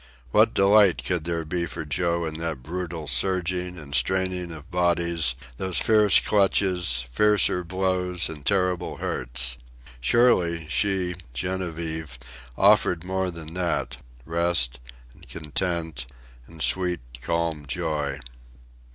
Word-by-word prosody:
What - - +4
delight 100 -2 +5
could 90 -4 -1
there 85 -1 -2
be 85 +2 -2
for 80 - -6
Joe 85 +4 0
in 80 0 -5
that 80 -6 -4
brutal 85 0 -5
surging 90 +6 0
and 70 -4 -9
straining 95 -1 0
of 80 -2 -10
bodies, 85 -5 +1 0.2
those 95 -2 0
fierce 105 -3 +5
clutches, 90 -10 +2
fiercer 105 +2 +3
blows, 90 0 -1
and 75 -3 -8
terrible 90 0 0
hurts? - - -2 0.4
Surely, 85 - +3
she, 95 0 0 0.2
Genevieve, 80 -3 -3 0.4
offered 85 -2 +4
more 95 0 -1
than 85 -2 -7
that 85 -8 -2 0.3
rest, 80 -7 +2 0.3
and - - -18
content, 80 -3 -3 0.4
and 80 -2 -6
sweet, 90 -4 +2 0.2
calm 85 -1 -2
joy. 75 -2 -2
85 Hz, 115 wpm, -25 LUFS, 80-90 Hz, 0.4 s, delight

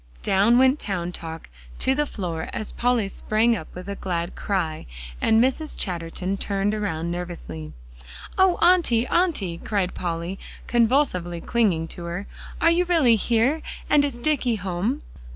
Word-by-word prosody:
Down 205 +5 +4
went 260 +3 +4
Town 180 -4 -3
Talk 165 -2 -7 0.3
to 265 - +2
the 295 +2 0
floor 170 -9 -4
as 215 - -3
Polly 240 -4 +1
sprang 220 +4 +1
up 160 -7 -6
with 180 +1 -8
a 200 - -3
glad 175 -3 -3
cry, 170 -6 -2 0.3
and 220 - +4
Mrs. 265 +6 +1
Chatterton 180 +1 -3
turned 200 +1 0
around 170 -6 -2
nervously. 165 - -6 0.6
"Oh, 375 -2 +4
Auntie 335 -10 +4
Auntie!" 250 - 0
cried 195 -4 -1
Polly, 170 +1 -3 0.3
convulsively 230 - +2
clinging 185 -6 +1
to 175 - -7
her, 175 +4 -4 0.3
"are 330 - +5
you 350 +2 +3
really 320 -10 +4
here, 235 +8 +2 0.3
and 295 -1 +6
is 280 -3 -1
Dicky 250 -2 +1
home?" 195 +8 -2
205 Hz, 150 wpm, -24 LUFS, 175-255 Hz, 0.6 s, and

